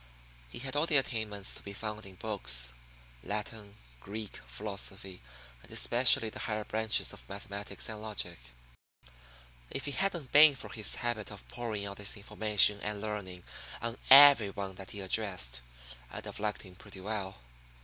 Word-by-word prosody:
He - - -10
had 130 +2 -5
all 150 +3 +2
the 155 - +5
attainments 110 -6 -1
to - - -9
be 100 - -8
found 105 0 -6
in 95 - -13
books 60 - +1 0.5
Latin, 105 - -5 0.2
Greek, 105 - -7
philosophy, 95 - -5 0.4
and - - -16
especially 120 -2 +5
the - - -8
higher 105 -1 -3
branches 110 +1 0
of - - -12
mathematics 100 +1 -5
and 110 -1 -7
logic. 100 -5 -4 1.3
If 135 - -4
it 145 - -3
hadn't 175 -9 -1
been 150 -1 +8
for - - -9
his 110 -4 0
habit 120 -3 -3
of 100 -2 -10
pouring 115 -4 -4
out 100 0 -6
this 105 +2 0
information 105 -1 +3
and 105 -1 -3
learning 100 -4 -5 0.4
on 115 0 -4
every 135 -6 +10
one 100 -1 -5
that 95 0 -10
he 100 - -6
addressed, 95 - -1 0.5
I'd - - -8
have - - -7
liked 105 0 -3
him 95 -3 -12
pretty 100 +1 -12
well. 100 -1 -4
105 Hz, 160 wpm, -31 LUFS, 100-110 Hz, 1.3 s, every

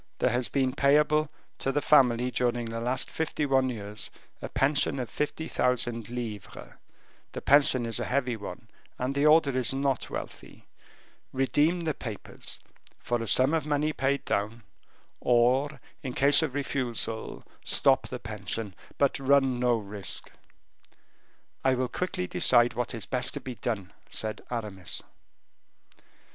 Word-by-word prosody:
There - - +2
has 120 0 0
been 130 -2 +1
payable 150 +2 +3 0.3
to 135 - 0
the 145 - +1
family 125 -4 +4
during 120 -1 0
the 115 0 -4
last 125 +2 0
fifty 160 -1 -2
one 135 -2 +2
years 105 -3 -4 0.3
a - - -5
pension 140 0 +2
of 125 -4 -4
fifty 160 +2 -3
thousand 120 -3 0
livres. 115 -5 -6 0.6
The - - -5
pension 135 -3 +4
is 115 -1 -1
a - - -2
heavy 125 -2 0
one, 110 +2 -8 0.3
and 130 +2 -2
the 140 +2 +3
order 150 -3 +5
is 130 0 +1
not 135 -2 -1
wealthy. - - -8 0.7
Redeem 145 +6 +2
the 160 -2 -1
papers, 110 -6 -7 0.4
for 120 -1 -2
a 115 - -4
sum 130 +7 +5
of 160 -2 0
money 150 +1 +1
paid 140 0 0
down, 110 +3 -2 0.6
or, 130 +4 +2 0.2
in 130 -5 -5
case 140 +3 +6
of 145 -5 -2
refusal, 120 -5 -3 0.2
stop - - +3
the - - -5
pension 105 0 -5 0.2
but 140 0 +2
run 135 -2 +3
no 120 -1 +3
risk." 100 -2 -4 1.3
"I 130 -1 +3
will 130 0 0
quickly 180 - -2
decide 120 +7 +5
what 120 0 -3
is 110 -5 -6
best 125 +5 0
to - - -3
be 130 - -6
done," 110 -5 -4 0.2
said 110 -1 -3
Aramis. 105 -7 -4
125 Hz, 150 wpm, -28 LUFS, 115-140 Hz, 1.3 s, case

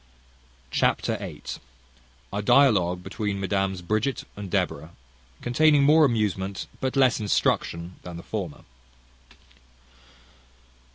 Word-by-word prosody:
Chapter - - +1
viii. - - -8 0.9
A 100 - -1
dialogue 95 -8 +4
between 100 0 -3
Mesdames 95 -1 -1
Bridget 110 +7 -1
and 100 -2 -7
Deborah; 80 -1 -2 0.5
containing 145 +4 +4
more 155 +2 +6
amusement, 100 -5 -1
but 130 0 -2
less 130 -3 +4
instruction, 90 -4 0
than 90 -1 -8
the 85 - -9
former. 95 -8 -5
100 Hz, 100 wpm, -25 LUFS, 90-125 Hz, 0.9 s, more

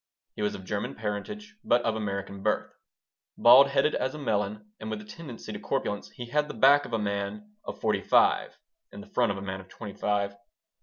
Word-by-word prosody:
He - - -5
was 105 - 0
of 95 - -9
German 100 +1 -3
parentage, 115 - -5
but 120 0 +3
of 115 -1 0
American 100 -2 -4
birth. - - 0 0.6
Bald 125 +4 +8
headed 140 +2 +2
as 130 +3 -1
a - - -5
melon 105 -5 -2
and 110 - -6
with 110 -1 -3
a 105 - -11
tendency 125 +2 -9
to - - -5
corpulence, 105 0 -2
he 120 - -8
had 150 +5 0
the 150 - -7
back 145 +2 +6
of - - -9
a - - +3
man 105 - -3
of - - -6
forty - - +1
five - - +3 0.3
and 205 - -9
the 205 -1 -19
front 120 - +3
of 100 - -3
a 95 - -6
man 95 -1 -4
of 95 - -18
twenty 105 -3 -8
five. 100 -1 -1
110 Hz, 215 wpm, -28 LUFS, 100-140 Hz, 0.6 s, Bald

